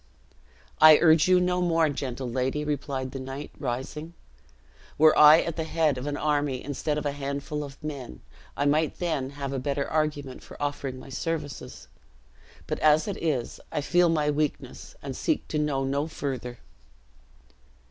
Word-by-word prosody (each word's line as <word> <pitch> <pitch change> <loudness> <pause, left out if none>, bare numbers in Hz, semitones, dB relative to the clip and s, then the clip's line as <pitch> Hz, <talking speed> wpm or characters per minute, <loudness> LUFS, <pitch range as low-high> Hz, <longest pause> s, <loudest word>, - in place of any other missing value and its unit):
"I 155 -1 +9
urge 160 -1 +5
you 185 0 +5
no 180 0 +1
more, 165 -2 +3
gentle 135 -3 -4
lady," 130 +4 -1
replied 140 -3 -3
the 135 - -6
knight, 135 +2 -7
rising; 145 +6 -5 0.8
"were 155 0 +6
I 150 +2 +8
at 170 -1 -4
the 160 - -1
head 160 -2 +1
of 130 - -5
an 145 0 -2
army, 145 -3 0
instead 145 +2 -2
of 150 - -3
a 145 - +1
handful 140 +1 -4
of 140 -2 -9
men, 135 - -6 0.4
I 145 - 0
might 155 +2 +1
then 155 -7 -2
have 140 -1 -5
a 135 - -1
better 140 +1 -2
argument 150 -4 -2
for - - -13
offering 145 -2 -3
my 130 - -11
services; 145 +1 -5 0.8
but - - -3
as 155 +3 +4
it 200 - -4
is, 140 -8 -2
I 150 - -1
feel 175 +3 +3
my 150 -2 +1
weakness, 145 -3 -3
and 135 -2 -5
seek 315 - -1
to 150 - -1
know 145 -3 0
no 140 +3 -1
further." 130 -6 -5
145 Hz, 170 wpm, -26 LUFS, 135-155 Hz, 0.8 s, I